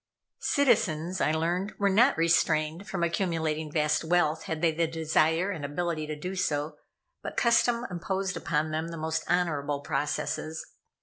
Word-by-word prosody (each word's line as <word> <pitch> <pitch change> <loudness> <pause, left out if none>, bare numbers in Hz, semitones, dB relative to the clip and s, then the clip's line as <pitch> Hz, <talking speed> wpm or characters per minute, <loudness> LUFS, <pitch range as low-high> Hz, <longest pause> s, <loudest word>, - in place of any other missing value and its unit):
Citizens, 185 - +1
I - - +3
learned, 175 +5 -1
were 200 - +2
not 235 +8 +4
restrained 165 +2 +1
from 185 -4 -2
accumulating 160 -3 -1
vast 150 0 +1
wealth 160 -2 +1
had 160 - -3
they 165 - +4
the 165 +1 0
desire 160 +3 +1
and 160 -7 -5
ability 155 +1 -2
to 155 - -4
do 180 +5 -5
so, 150 -5 -1 0.4
but - - -7
custom 235 0 +3
imposed 190 +2 -2
upon 155 -1 -1
them 160 +1 -2
the 170 0 -6
most 160 0 -2
honorable 145 -5 0
processes. 150 +2 -2
165 Hz, 150 wpm, -28 LUFS, 155-180 Hz, 0.4 s, not